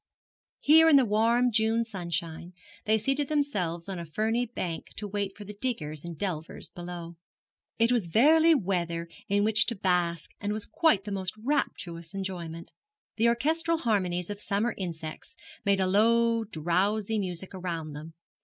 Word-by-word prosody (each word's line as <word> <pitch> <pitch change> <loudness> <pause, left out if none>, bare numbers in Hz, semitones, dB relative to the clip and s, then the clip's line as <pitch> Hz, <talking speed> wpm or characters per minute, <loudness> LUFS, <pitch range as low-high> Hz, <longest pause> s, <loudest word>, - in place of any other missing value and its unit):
Here 320 +2 +7
in 305 - +7
the 270 -2 +6
warm 230 +3 +3
June 225 +1 +2
sunshine 170 -4 -5 0.3
they 220 +1 +4
seated 270 +6 0
themselves 200 - -1
on 190 -3 -4
a 170 - -5
ferny 225 +8 0
bank 175 -7 -4
to 210 - -4
wait 200 -1 -3
for 205 - -9
the 210 - -8
diggers 165 - -3
and 170 -2 -7
delvers 165 -4 -5
below. 175 -1 -8 0.6
It 230 +1 +3
was 235 -8 +1
verily 315 - +5
weather 170 - -1 0.2
in 205 +1 +2
which 220 +2 +4
to 235 - -1
bask 175 -3 0
was 210 +1 -1
quite 275 - +2
the 205 - -6
most 190 -1 -3
rapturous 175 - -2
employment. 175 -4 -5 0.5
The 230 +1 +3
orchestral 320 +8 +1
harmonies 185 - 0
of 205 - -6
summer 210 +4 0
insects 165 -4 -6 0.3
made 200 -1 +3
a 190 - +2
low 230 +3 +3
drowsy 200 +5 0
music 185 -1 -5
around 170 -5 -4
them. 155 +2 -9
200 Hz, 155 wpm, -28 LUFS, 170-230 Hz, 0.6 s, Here